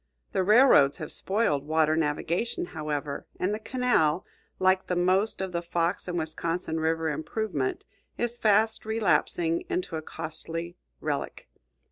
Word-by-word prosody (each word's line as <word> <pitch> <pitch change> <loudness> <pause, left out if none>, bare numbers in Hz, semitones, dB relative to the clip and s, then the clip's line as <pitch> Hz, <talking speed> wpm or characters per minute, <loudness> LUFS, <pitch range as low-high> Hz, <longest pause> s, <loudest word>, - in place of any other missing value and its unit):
The - - +1
railroads 205 - +6
have 155 - -6
spoiled 190 -9 0
water 155 0 +3
navigation, 165 +9 -1
however; 150 -3 -4
and 185 +3 0
the 215 - -3
canal, 225 -10 +1 0.3
like 185 0 +2
the 180 - 0
most 185 +4 +2
of 190 -1 -3
the 170 -1 -2
Fox 170 +1 -1
and 175 -1 -2
Wisconsin 165 +1 -2
river 160 0 0
improvement, 155 -1 -2 0.3
is 240 0 -1
fast 220 -1 +3
relapsing 175 -6 +1
into 180 -2 -2
a - - -4
costly 165 +2 -5 0.3
relic. - - -3
170 Hz, 135 wpm, -27 LUFS, 160-200 Hz, 0.3 s, railroads